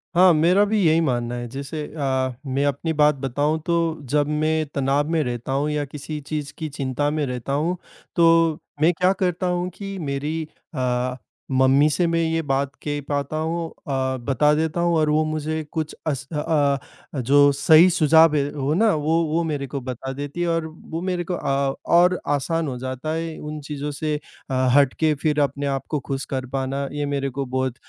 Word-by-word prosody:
हाँ, 180 0 +7
मेरा 175 +6 +4
भी 215 +1 +1
यही 160 +1 +4
मानना 120 -5 -1
है। 120 0 -4
जैसे 140 +4 -5
अ, 130 -4 -1
मैं 135 +1 0
अपनी 145 +4 -1
बात 150 0 +4
बताऊँ 145 +5 0
तो 170 - +1 0.3
जब 145 +1 +2
मैं 155 +1 +1
तनाव 140 +1 +1
में 165 -1 +2
रहता 120 0 -4
हूँ 140 +3 0
या 150 -1 -1
किसी 150 +2 -6
चीज़ 150 -2 -4
की 160 -1 -4
चिंता 140 0 -1
में 150 -1 0
रहता 125 +1 -4
हूँ, 165 +6 0 0.4
तो 165 -2 +4 0.2
मैं 170 +3 +5
क्या 180 +3 +2
करता 185 -1 -1
हूँ 180 0 -1
कि 195 -1 -6
मेरी 150 +1 -2 0.3
अ, 125 0 0 0.4
मम्मी 130 +3 +4
से 175 +4 +1
मैं 165 0 +1
ये 165 0 0
बात 140 -2 -1
कह 145 -1 -2
पाता 145 +1 -1
हूँ 165 +1 -2
अ, 130 -4 -3
बता 135 +4 +2
देता 160 +2 0
हूँ 170 -1 +2
और 155 -1 +2
वो 155 +1 +3
मुझे 155 0 -2
कुछ 155 -2 -3
अस 140 -2 -2
अ - - -3 0.8
अ, - - -1
जो 145 +3 +5
सही 160 +5 +6
सुझाव 160 -2 +5
है, 140 -1 +1
वो 145 0 -1
ना, 215 +4 +3
वो 160 +2 +1
वो 160 +2 0
मेरे 145 -4 -2
को 135 +1 -5
बता 130 +1 -5
देती 145 +4 -5
है 175 - +1
और 165 -1 0
वो 160 +1 -7
मेरे 180 -1 -1
को 180 - -4
अ, 140 -4 0 0.2
और 180 +1 +5
आसान 155 +3 0
हो 130 -2 -4
जाता 130 +4 -4
है 165 0 -3
उन 150 0 -6
चीज़ों 145 0 -5
से 150 +1 -2 0.3
अ, - - -3 0.2
हट 140 -2 +5
के 155 -1 +3
फिर 150 -1 +2
अपने 145 0 -1
आप 135 -1 -2
को 150 - 0
खुश 135 0 -4
कर 130 -1 -2
पाना। 135 +1 -2
ये 145 0 -2
मेरे 140 -1 -1
को 135 +1 -3
बहुत 130 -1 -2
150 Hz, 200 wpm, -23 LUFS, 135-160 Hz, 0.8 s, हाँ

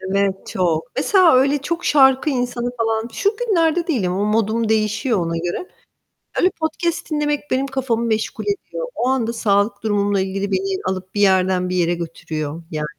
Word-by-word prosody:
Evet, 195 0 -1
çok. 170 -4 0
Mesela 350 +3 +5
öyle 275 +3 +4
çok 335 +4 -3
şarkı 265 0 +4
insanı 245 -2 -2
falan 225 0 0
şu 400 - 0
günlerde 350 -8 +1
değilim, 225 - 0
o 195 +3 0
modum 220 +1 +1
değişiyor 215 +1 +1
ona 165 -1 -1
göre. 175 - -3 0.7
Öyle 365 - +4
podcast 325 +1 -2
dinlemek 295 -1 0
benim 265 +1 +1
kafamı 260 -4 -1
meşgul 220 -1 -1
ediyor. 415 +5 -3
O 245 - -1
anda 245 -3 0
sağlık 205 -2 +1
durumumla 205 -2 +1
ilgili 195 +1 -3
beni 190 0 -1
alıp 185 0 -4
bir 205 - +1
yerden 185 -2 +3
bir 185 - -2
yere 175 -1 +2
götürüyor 160 -2 -5
yani. 155 -1 -2
220 Hz, 165 wpm, -20 LUFS, 190-270 Hz, 0.7 s, Mesela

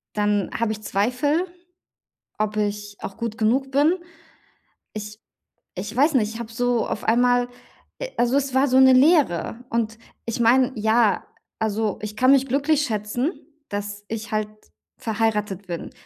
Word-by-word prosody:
dann 205 -2 +1
habe 230 -2 0
ich 215 0 -5
Zweifel, 255 - +1 0.9
ob 215 0 -1
ich 205 0 -2
auch 195 - -7
gut 230 -2 -4
genug 265 +5 +1
bin. 290 +5 +4 1.0
Ich 210 +1 -7 0.5
ich 205 +5 -6
weiß 285 +4 +3
nicht. 225 -3 +1
Ich 235 - -7
habe 230 -1 -6
so 245 0 0
auf - - -4
einmal 245 +1 +3 0.5
äh, - - -4
also, 245 +3 +2
es 270 -2 0
war 270 +2 +4
so 260 +1 +4
'ne 260 0 +8
Leere. 255 - +3
Und 225 -1 -1 0.3
ich 230 +1 -3
meine 250 +3 +4
ja, 220 0 +2 0.3
also, 215 -2 -1
ich 210 0 -6
kann 255 +1 +4
mich 270 -1 +4
glücklich 285 +3 +2
schätzen, 230 - -1 0.4
dass 205 0 -5
ich 225 0 -5
halt 215 0 0 0.5
verheiratet 210 -3 -1
bin. 170 -2 -5
225 Hz, 155 wpm, -23 LUFS, 210-260 Hz, 1.0 s, ne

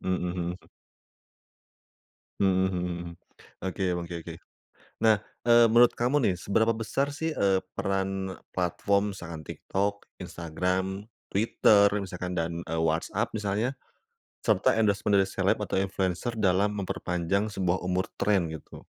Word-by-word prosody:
Mhm 95 0 0
mhm. 85 -1 -2 1.9
Mmm 95 -1 +3
mhm 90 -1 -2
mhm, 85 -1 -5 0.6
oke 95 +1 -3 0.2
oke 85 0 -6
oke. 85 - -7 0.7
Nah, 110 -2 +5 0.2
eee, 120 0 +6
menurut 115 +2 +5
kamu 130 +4 +2
nih 100 -6 +2
seberapa 110 +5 +2
besar 115 +5 -1
sih, 160 +2 -3
eee, 100 -5 +3 0.2
peran 95 -1 -2 0.2
platform 100 +3 +1
misalkan 85 -5 -8
TikTok, 100 +4 -3 0.2
Instagram, 90 +4 -2 0.2
Twitter 100 -1 +4
misalkan 90 -2 -4
dan, 85 +1 -2
eee, 80 -1 -3
WhatsApp 80 +8 0
misalnya, 105 +4 -1 0.7
serta - - +3
endorsement 100 -2 +2
dari 95 - +4
seleb 95 - +1
atau 95 - -1
influencer 95 +4 -2
dalam 100 0 +3
memperpanjang 95 +1 -1
sebuah 95 -3 -1
umur 90 +1 0 0.2
tren 95 -6 +2
gitu? 80 - -10
95 Hz, 125 wpm, -28 LUFS, 90-105 Hz, 1.9 s, eee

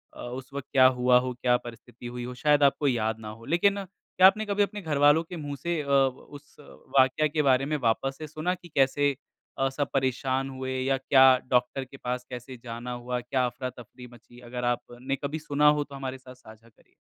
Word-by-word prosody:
अ, - - -10
उस 125 +2 -7
वक़्त 140 -1 -6
क्या 130 -2 +6
हुआ 125 -1 +3
हो, 125 0 -3
क्या 125 0 +1
परिस्थिति 120 0 -11
हुई 120 0 -6
हो, 125 - -6
शायद 150 +2 +3
आपको 140 +1 +3
याद 110 -3 0
ना 110 -1 -8
हो। 115 +2 -11
लेकिन 200 +4 +2
क्या 185 0 +3
आपने 215 +3 +2
कभी 205 0 +1
अपने 205 0 -4
घरवालों 145 0 +3
के 175 +2 -9
मुँह 145 -2 -5
से 170 -2 -1
अ, 140 - -9
उस 140 +1 -1 0.4
वाक्या 130 +4 +3
के 150 +1 0
बारे 135 0 +3
में 150 +1 -1
वापस 135 +2 0
से 155 - -7
सुना 155 +4 -2
कि 175 -1 -15
कैसे 140 +1 +3 0.4
अ, 135 0 +1
सब 140 +2 -3
परेशान 130 0 0
हुए 130 0 -4
या 135 0 +1
क्या 135 0 +5 0.2
डॉक्टर 125 +2 +1
के 135 +2 -14
पास 125 -1 -4
कैसे 125 +1 -8
जाना 120 +1 -6
हुआ, 125 0 -4
क्या 125 +1 0
अफ़रा-तफ़री 125 0 -8
मची? 120 +1 -17
अगर 125 0 -6
आपने 125 +3 -4
कभी 150 +3 -3
सुना 150 0 +1
हो 145 - 0
तो 140 -1 -12
हमारे 135 -1 -5
साथ 130 -1 -14
साझा 115 -2 -17
करिए। 110 - -30
130 Hz, 210 wpm, -27 LUFS, 125-145 Hz, 0.4 s, क्या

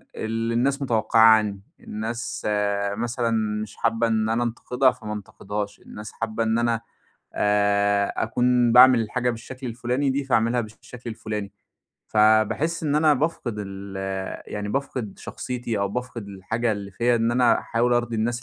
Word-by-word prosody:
اللي 115 +1 -2
الناس 135 +4 +1
متَوقّعاه 110 -4 +2 0.2
عنّي. 105 -2 -2 0.2
الناس 115 +2 -5 0.5
مثلًا 120 0 -1 0.3
مش 110 -1 -7
حابّة 115 0 +1
إن 110 -1 +1
أنا 115 +2 +1
أنتقدها 125 +2 +1
فما 110 -4 -7
أنتقدهاش، 105 0 -5
الناس 105 0 -10
حابّة 115 0 -2
إن 110 0 +1
أنا 115 -1 +1 0.5
آآ 100 -1 +2
أكون 125 +1 +2
باعمل 125 0 +8
الحاجة 125 +3 -1
بالشكل 125 +3 -8
الفُلاني 125 +4 -1
دي 140 +1 -1
فاعملها 120 -2 +2
بالش 110 -1 -7
الشكل 125 -1 -9
الفُلاني. 105 -3 -5 0.6
فباحس 110 +10 +3
إن 150 -2 0
أنا 155 0 +4
بافقد 140 -5 -2
ال 100 -1 -7 0.6
يعني 105 0 -3
بافقد 125 -4 -3
شخصيتي 120 -3 -4
أو 100 0 0
بافقد 120 -1 -5
الحاجة 110 +4 -2
اللي 100 -1 -6
فيّا 120 +4 +1
إن 115 0 +1
أنا 120 0 +4
أحاول 120 +1 0
أرضي 120 -1 0
الناس 120 +2 -1
115 Hz, 150 wpm, -24 LUFS, 105-125 Hz, 0.6 s, باعمل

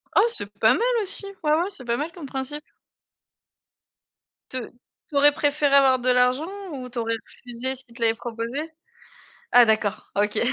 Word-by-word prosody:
Oh 405 - +6
c'est 205 - +1
pas 220 - +5
mal - - -1 0.2
aussi, 395 0 +4 0.2
ouais, 300 0 +2
ouais, 345 +4 0
c'est 270 -10 -6
pas 235 0 -1
mal 300 +5 -4
comme 330 -4 -10
principe. 270 +3 -5 1.9
Te 260 - -5 0.5
tu 295 - -10
aurais 290 +1 +6
préféré 290 -1 +1
avoir 265 -2 +5
de 255 +1 -1
l'argent 250 +5 +2 0.2
ou 255 -3 -7
tu 245 - -9
aurais 230 0 -1
refusé 250 +2 -5
s'il 255 -2 -5
te 240 - -12
l'avais 225 -1 +4
proposé? 240 +7 -5 0.8
Ah 245 -1 +7
d'accord, 215 -1 -1
OK. 210 +1 0
260 Hz, 170 wpm, -23 LUFS, 235-295 Hz, 1.9 s, Ah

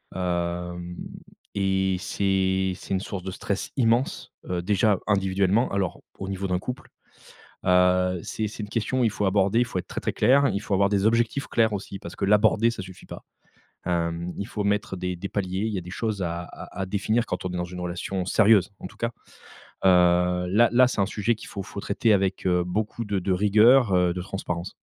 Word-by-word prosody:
hem, 90 -1 -3 0.6
et 95 -1 +1
c'est 95 -1 0
c'est 95 - -6
une - - +1
source 100 -1 -5
de 95 - -4
stress 100 +1 -4
immense, 120 +1 +1 0.2
heu, 90 -1 -1
déjà 100 +1 +2
individuellement 100 +2 +2
alors 100 -3 -2 0.2
au 95 - -6
niveau 95 0 -3
d'un 90 -1 0
couple, 125 +7 -7 0.8
heu, 90 0 +3
c'est 110 - -3
c'est 110 - -8
une 105 - -7
question 120 +4 0
il - - +3
faut 105 0 -2
aborder, 100 +3 +2
il 120 - +3
faut 105 -6 -3
être - - -7
très - - -5
très - - -2
clair, 135 +5 +4
il 100 - -1
faut 105 -1 -4
avoir 100 +1 +3
des 100 0 +1
objectifs 115 +4 +1
clairs 110 -1 +2
aussi 100 -1 -5
parce 85 - -9
que - - 0
l'aborder 105 +3 +4
ça 110 - -6
suffit 95 -1 -11
pas. - - -9 0.6
Hem, 85 0 -1
il 100 - -4
faut 105 - -3
mettre 100 -1 0
des 90 0 -3
des 100 - -5
paliers, 95 0 -2
il 110 - -2
y - - -1
a - - -3
des 90 - -10
choses 105 +1 -3
à 85 -1 -3
à 90 - -10
à - - -2
définir 105 +5 0
quand 90 - -4
on - - -1
est 90 - -3
dans 90 - -1
une 90 0 -8
relation 90 +2 -3
sérieuse 105 0 +4
en - - -6
tout - - -18
cas. 115 - -1 0.8
Heu, 90 0 +4
là 110 +5 +4
là 125 +2 +6
c'est 125 - -1
un - - +3
sujet 105 +2 0
qu'il - - -11
faut 100 - -6
faut 100 - -8
traiter 105 +3 +2
avec, 95 -1 0
heu, 90 -1 +2
beaucoup 105 +5 -3
de 100 -1 -1
de 95 +1 -2
rigueur, 105 +3 +5
heu, 90 -1 +3
de 90 - -4
transparence. 90 -2 -5
95 Hz, 215 wpm, -25 LUFS, 90-105 Hz, 0.8 s, là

